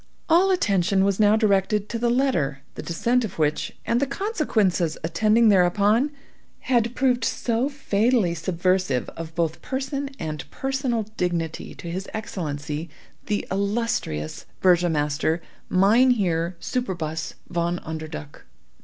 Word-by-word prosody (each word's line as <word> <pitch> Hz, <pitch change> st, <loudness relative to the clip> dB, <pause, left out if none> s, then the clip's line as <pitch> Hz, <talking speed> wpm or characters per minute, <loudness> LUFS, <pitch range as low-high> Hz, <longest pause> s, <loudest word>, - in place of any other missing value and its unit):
All 345 Hz, +4 st, +5 dB
attention 195 Hz, -, +2 dB
was 200 Hz, 0 st, +1 dB
now 210 Hz, 0 st, +5 dB
directed 210 Hz, -1 st, +2 dB
to 230 Hz, -, -3 dB
the 240 Hz, 0 st, +1 dB
letter, 235 Hz, -, +1 dB
the -, -, -6 dB
descent 240 Hz, +9 st, +1 dB
of 215 Hz, -, -5 dB
which, 155 Hz, -1 st, -1 dB
and 235 Hz, -, +2 dB
the 280 Hz, -, +1 dB
consequences 225 Hz, -, 0 dB
attending 215 Hz, +7 st, +3 dB
thereupon, 205 Hz, +7 st, +4 dB, 0.5 s
had 240 Hz, -2 st, +1 dB
proved 250 Hz, -2 st, +2 dB
so 235 Hz, +3 st, 0 dB
fatally 230 Hz, -7 st, +1 dB
subversive 175 Hz, -4 st, 0 dB
of 165 Hz, -1 st, -8 dB
both 165 Hz, -2 st, -1 dB
person 275 Hz, +1 st, -3 dB
and 155 Hz, -3 st, -5 dB
personal 265 Hz, -, -1 dB
dignity 170 Hz, -3 st, -2 dB
to -, -, -9 dB
his 190 Hz, +3 st, -5 dB
Excellency, 155 Hz, -6 st, -4 dB, 0.4 s
the 210 Hz, -2 st, -1 dB
illustrious 200 Hz, -, -2 dB
Burgomaster 160 Hz, -3 st, +2 dB, 0.3 s
Mynheer 195 Hz, -5 st, +3 dB
Superbus 165 Hz, -, -3 dB
Von 170 Hz, 0 st, 0 dB
Underduk. 155 Hz, -, -7 dB
195 Hz, 120 wpm, -24 LUFS, 165-235 Hz, 0.5 s, All